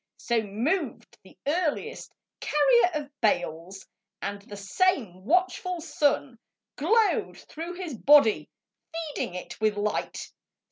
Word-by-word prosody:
So 235 -2 0
moved 230 - -2
the - - -18
earliest 335 +8 -1 0.3
carrier 275 -1 +4
of 295 -1 -4
bales, 185 - -1 0.3
And 200 0 -4
the 205 0 -10
same 200 - 0
watchful 365 - +1
sun 290 -6 0 0.4
Glowed 425 +8 +2
through 335 +3 -7
his 350 -6 -5
body 280 -2 +5 0.4
feeding 320 - -4
it 180 - -8
with 215 -1 +2
light. 210 +1 -2
285 Hz, 110 wpm, -27 LUFS, 210-335 Hz, 0.4 s, body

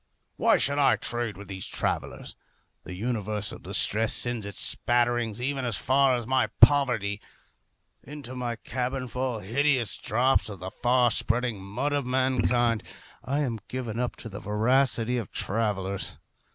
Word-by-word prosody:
Why - - +4
should 140 +1 0
I 140 - +5
trade 120 -5 -3
with 100 - -10
these 95 -2 -5
travellers? - - -3 0.5
The 90 - -7
universal 105 -1 -3
distress 110 +1 +2
sends 120 -4 -1
its 100 - -6
spatterings 120 -2 +1
even 135 +1 -2
as 120 -5 0
far 130 0 +3
as 120 - -5
my 130 +2 +2
poverty. 115 -8 +4 0.8
Into 140 -2 -9
my 120 -2 -3
cabin 125 +3 -3
fall 125 -1 -3
hideous 125 +3 +1
drops 125 +2 +2
of 100 - -7
the 95 +2 -6
far 125 0 +2
spreading 115 -3 +1
mud 120 +10 -2
of 140 -3 -1
mankind. 125 -3 +2 0.4
I 140 +3 -1
am 120 -6 -2
given 120 -3 -4
up 125 -1 -2
to - - -8
the 105 0 -7
voracity 120 +3 +1
of 110 - -7
travellers. 100 -2 -2
120 Hz, 150 wpm, -27 LUFS, 110-130 Hz, 0.8 s, I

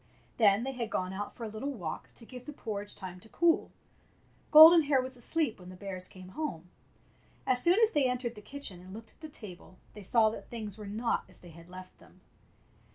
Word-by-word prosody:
Then 210 -1 +4
they 270 - -2
had 240 -4 -4
gone 185 -2 -2
out 205 +2 -5
for 240 - -8
a - - -3
little 215 +6 -5
walk 175 -10 -6
to 230 - -9
give 250 +1 -11
the 295 - -6
porridge 205 -6 -6
time 185 -1 -8
to 220 - -16
cool. 335 +5 +2 0.8
Golden 320 +2 +10
Hair 285 -3 +2
was 260 0 -6
asleep 260 0 +1
when 180 0 -12
the 185 - -10
bears 185 -1 -5
came 185 -1 -12
home. 185 - -5 0.7
As 250 -1 +2
soon 350 - +4
as 450 -1 +4
they 280 -4 +2
entered 250 -1 -2
the 210 - -12
kitchen 215 -8 -6
and 185 +2 -11
looked 225 +1 -11
at - - -24
the 315 - -8
table 185 -8 -11 0.2
they 210 - -10
saw 220 +2 +3
that - - -9
things 215 -4 -6
were 210 -2 -9
not 225 +4 -1
as 185 - -7
they 175 - -14
had 170 +1 -15
left 185 0 -11
them. - - -20
220 Hz, 225 wpm, -30 LUFS, 185-260 Hz, 0.8 s, Golden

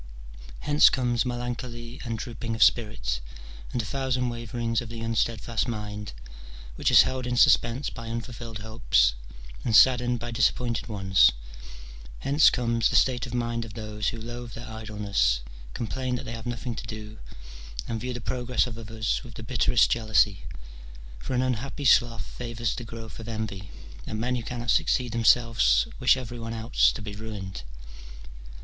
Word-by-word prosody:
Hence 150 0 +6
comes 120 -3 0
melancholy 120 0 -5
and 115 -2 -3
drooping 115 -1 -5
of 110 - +5
spirit, - - +1 0.5
and - - -2
a 115 - -2
thousand 130 0 -1
waverings 115 0 -2
of 120 - -8
the 115 0 -7
unsteadfast 115 0 -1
mind, 105 - -5 0.6
which - - +1
is - - +8
held 130 -1 -3
in 125 0 -1
suspense 120 +3 +4
by 115 -1 -8
unfulfilled 115 -1 -6
hopes, 110 - +2 0.5
and 110 - +1
saddened 125 0 +5
by 120 +1 -5
disap 115 - +3
pointed 120 -2 -3
ones: 95 -3 +4 0.8
hence 140 +3 +5
comes 115 -2 +1
the - - -2
state 125 -1 +3
of 125 - -5
mind 120 -1 -1
of 110 -2 -10
those 110 -1 -4
who 115 - -2
loathe 120 +1 -7
their 120 - -8
idleness, 105 - 0 0.3
complain 125 +2 -2
that - - -5
they - - -5
have 115 +1 -7
nothing 120 0 -3
to 110 - -7
do, 110 0 -8 0.7
and 110 -1 -3
view 125 +1 -3
the 120 - -4
progress 125 +2 0
of 115 -2 -7
others 110 0 -2
with 120 -2 -12
the 115 - -7
bitterest 120 0 +3
jealousy: 110 -3 +2 0.7
for - - -4
an 125 - +2
unhappy 130 +3 -3
sloth 120 -2 +4
favours 115 -1 -3
the 120 - -6
growth 115 -1 -9
of 115 - -8
envy, 105 -4 -5 0.4
and 110 - -4
men 125 +2 0
who 120 - -2
cannot 120 +1 -2
succeed 125 -2 +2
themselves 115 - +4
wish 125 +1 +5
every 120 -2 -6
one 115 0 -5
else - - +3
to - - -7
be 100 -1 -6
ruined. 100 - -7
115 Hz, 170 wpm, -26 LUFS, 110-120 Hz, 0.8 s, is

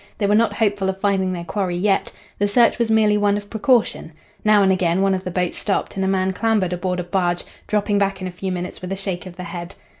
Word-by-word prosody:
They 205 - 0
were 200 - +2
not 225 +1 +3
hopeful 205 -3 0
of 190 0 -3
finding 195 -2 +1
their 175 -2 -4
quarry 185 0 -2
yet. 195 +2 +1 0.3
The 205 - +2
search 235 +3 +3
was 235 -1 +1
merely 215 -1 +3
one 205 0 +2
of 205 0 -8
precaution. 220 -7 +1 0.3
Now 210 -1 +5
and 190 - +4
again 185 0 +1
one 195 0 +3
of 185 0 -2
the - - -2
boats 180 -1 -2
stopped 200 - -1
and 195 - -1
a - - +1
man 190 0 +1
clambered 210 -4 +1
aboard 180 0 -2
a - - -2
barge, 175 -1 -1 0.2
dropping 205 -1 +1
back 195 -1 0
in 185 - -4
a - - -5
few 185 +2 -4
minutes 180 0 -5
with 185 0 -6
a - - 0
shake 190 -1 -4
of 180 - -10
the 180 - -7
head. 170 +1 -7
195 Hz, 260 wpm, -21 LUFS, 180-205 Hz, 0.3 s, Now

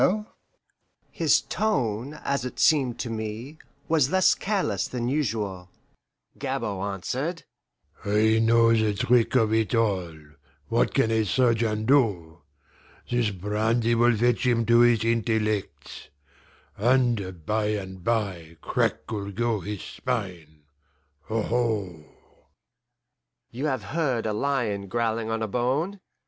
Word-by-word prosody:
His - - +3
tone, 135 - -1
as 140 -3 -1
it 125 - -6
seemed 135 -6 +3
to 120 - -4
me, 110 +7 -6 0.3
was 155 -5 +3
less 185 +1 +4
careless 185 - -1
than 120 -1 -3
usual. 105 -10 -2 0.7
Gabord 100 0 -3
answered, 140 - -4 0.6
"I 110 +2 +3
know 115 0 +4
the 110 -2 +1
trick 120 +4 +2
of 110 -3 +3
it 110 +1 +1
all 95 -8 0 0.5
what - - +1
can 115 - +2
a 110 -1 +2
surgeon 115 -1 +1
do? 100 - +1 0.7
This 120 -3 +2
brandy 110 +4 0
will 120 0 +3
fetch 120 +1 +2
him 115 -2 +2
to 115 +1 +5
his 120 -2 +4
intellects. 110 -6 -2 0.7
And 110 -8 +1
by 110 +2 0
and 95 -3 -4
bye 95 -8 -2
crack'll 105 -3 -2
go 115 +1 0
his 100 +1 -6
spine 90 - -5 0.7
aho!" 110 -7 -1 1.5
You 130 +6 -3
have 130 -7 -2
heard 130 -1 -1
a 110 - -1
lion 110 -5 -1
growling 115 0 -1
on 115 0 -1
a - - -1
bone. 135 - -1
115 Hz, 120 wpm, -25 LUFS, 105-125 Hz, 1.5 s, to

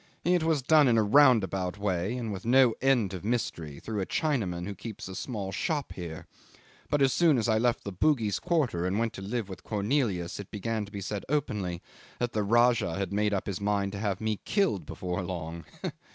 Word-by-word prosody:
It 175 0 +3
was 160 -4 +1
done 150 0 +5
in 115 -2 +4
a 110 - +4
roundabout 105 -7 +4
way, 100 +3 -1
and 115 -4 -3
with 95 - -6
no 125 0 +5
end 125 -8 +2
of 95 - -6
mystery, 85 -10 -2
through 105 -3 -3
a 95 - -3
Chinaman 105 - -1
who 100 - -4
keeps 110 0 -8
a 95 - -7
small 100 -1 -4
shop 145 - -2
here; 85 -3 -7 0.6
but 145 -1 +2
as 135 -3 +3
soon 165 -3 +4
as 115 - 0
I 110 -1 +3
left 120 0 +1
the 100 - -5
Bugis 110 - +1
quarter 135 - 0
and 95 +2 0
went 115 0 0
to - - -8
live 110 +2 -3
with 95 - -9
Cornelius 105 -5 -1
it 100 - -7
began 110 +1 -2
to 100 - -14
be 100 -1 -5
said 100 +1 -4
openly 105 - -1 0.3
that 120 -1 -2
the 110 - +1
Rajah 115 -4 +3
had 100 -1 -3
made 105 +1 +1
up 100 -2 -1
his 100 -1 -4
mind 100 -1 0
to 100 - -6
have 100 -3 -1
me 110 -2 -1
killed 170 - 0
before 90 0 -3
long. 85 -2 -5
105 Hz, 210 wpm, -29 LUFS, 95-125 Hz, 0.6 s, done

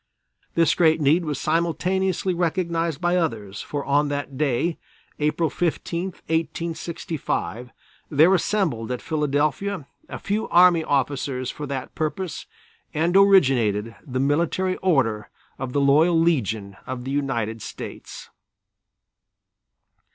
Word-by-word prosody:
This 165 -1 +4
great 160 -2 +3
need 155 +4 +3
was 150 -3 -3
simultaneously 180 +3 0
recognized 170 -3 -1
by 175 0 +1
others, 110 - -2
for 145 -1 -4
on 145 +2 +2
that 145 -1 -4
day, 150 +4 0 0.4
April 150 +2 +1
15, 170 +1 -2
1865, 160 - -3 0.4
there 160 +5 +5
assembled 160 - 0
at 125 - -2
Philadelphia 150 +4 -1 0.2
a - - -5
few 210 +2 -2
army 175 -2 +6
officers 135 -2 -1
for 150 - -7
that 135 -2 -5
purpose 165 +3 -3 0.5
and 165 +4 +1
originated 130 - +4
the 130 -4 -4
Military 170 +7 +1
Order 130 - +1 0.3
of 130 -1 -4
the 140 - +1
Loyal 155 +5 +4
Legion 110 - 0
of 130 -1 -5
the 135 - -4
United 120 -6 -2
States. - - -9
155 Hz, 115 wpm, -23 LUFS, 135-170 Hz, 0.5 s, army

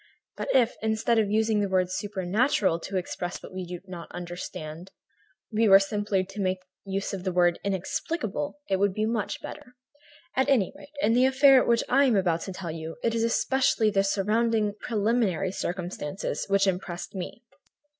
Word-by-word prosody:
But - - -5
if, 245 -3 +4
instead 220 +1 +1
of 210 -2 +1
using 220 0 +2
the 200 -1 0
word 185 -1 +1
'supernatural' 200 - +1
to 190 +3 -4
express 175 -1 -4
what - - -10
we 185 -1 -5
do 175 0 -6
not 180 -3 -9
understand, 175 -1 -7 0.6
we 220 +1 +3
were 195 - +10
simply 200 -1 0
to 195 +2 -6
make 185 -1 +1 0.3
use 195 +1 -3
of 190 -2 -4
the 185 - -1
word 175 -1 +3
'inexplicable,' 200 - -2
it 195 - +1
would 200 0 +1
be 215 - 0
much 220 -2 -2
better. 250 - -9 0.6
At 265 +2 +2
any 245 -8 +3
rate, 285 - -13
in 225 - +4
the 250 +2 +5
affair 270 0 +6
of - - -2
which 235 -1 +3
I 275 +2 +4
am 250 -5 +3
about 175 -4 +1
to - - -4
tell 180 -3 -5
you, 160 0 -6
it 230 - +1
is 230 0 0
especially 230 -1 +2
the 195 -1 +2
surrounding, 210 +2 +1
preliminary 210 -4 0
circumstances 180 -2 -4
which 200 0 +3
impressed 180 -2 -3
me. 190 +4 -6
200 Hz, 180 wpm, -27 LUFS, 185-225 Hz, 0.6 s, were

